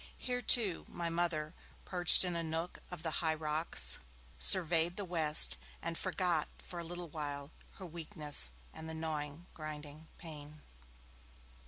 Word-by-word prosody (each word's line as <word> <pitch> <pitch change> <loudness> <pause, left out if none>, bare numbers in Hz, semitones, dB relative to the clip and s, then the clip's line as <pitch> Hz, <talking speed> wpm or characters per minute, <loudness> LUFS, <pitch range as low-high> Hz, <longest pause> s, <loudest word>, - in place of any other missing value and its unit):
Here, 250 -1 -3
too, 215 -9 +4
my 170 -1 -4
Mother, 165 -2 -1 0.3
perched 180 0 +7
in 175 -1 -2
a 170 - -2
nook 165 +2 -4
of 180 -3 -8
the 160 - -1
high 160 -1 +1
rocks, 155 +1 +4 0.4
surveyed 170 - +2
the 205 - -4
west, 160 -4 +3 0.2
and 165 0 -4
forgot 180 -3 -1
for 175 - -9
a - - -5
little 175 0 -7
while 145 -1 -5 0.2
her 190 - -10
weakness 155 - 0 0.2
and 160 0 -8
the 160 - -5
gnawing, 155 0 -4
grinding 155 0 -8
pain. 150 -2 -10
160 Hz, 145 wpm, -34 LUFS, 155-175 Hz, 0.4 s, perched